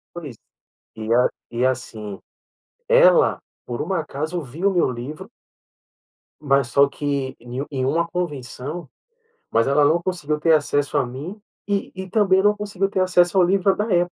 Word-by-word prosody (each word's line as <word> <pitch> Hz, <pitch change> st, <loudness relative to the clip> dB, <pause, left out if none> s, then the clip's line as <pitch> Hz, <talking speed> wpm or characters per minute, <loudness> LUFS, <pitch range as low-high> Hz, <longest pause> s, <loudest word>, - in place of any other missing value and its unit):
Pois, 150 Hz, -9 st, -7 dB, 0.6 s
e 110 Hz, -, -7 dB, 0.5 s
e 120 Hz, +2 st, 0 dB
assim, 110 Hz, -6 st, -4 dB, 0.7 s
ela -, -, +5 dB, 0.3 s
por 120 Hz, -1 st, -4 dB
um 185 Hz, +5 st, -2 dB
acaso 160 Hz, 0 st, -3 dB
viu 160 Hz, +8 st, -1 dB
o 195 Hz, -, -2 dB
meu 175 Hz, -, +2 dB
livro 125 Hz, +6 st, -7 dB, 1.1 s
mas 140 Hz, -3 st, +2 dB
só 140 Hz, +3 st, +4 dB
que 140 Hz, -2 st, -3 dB
ne 125 Hz, +3 st, -5 dB
em 130 Hz, -3 st, -2 dB
uma 165 Hz, +5 st, +1 dB
convenção, 150 Hz, -2 st, -5 dB, 0.6 s
mas 115 Hz, -, +2 dB
ela 145 Hz, +1 st, +4 dB
não 160 Hz, +4 st, +3 dB
conseguiu 155 Hz, -5 st, -2 dB
ter 165 Hz, +1 st, +4 dB
acesso 145 Hz, -1 st, +1 dB
a -, -, +2 dB
mim, 145 Hz, -, -7 dB, 0.3 s
e 200 Hz, -1 st, -1 dB
e 190 Hz, 0 st, -7 dB
também 190 Hz, -3 st, +3 dB
não 210 Hz, +1 st, +3 dB
conseguiu 200 Hz, -2 st, -2 dB
ter 190 Hz, -, -1 dB
acesso 180 Hz, 0 st, +3 dB
ao 180 Hz, -, +6 dB
livro 190 Hz, +1 st, +2 dB
da 210 Hz, -, 0 dB
época, 175 Hz, 0 st, +2 dB
155 Hz, 160 wpm, -22 LUFS, 135-185 Hz, 1.1 s, ao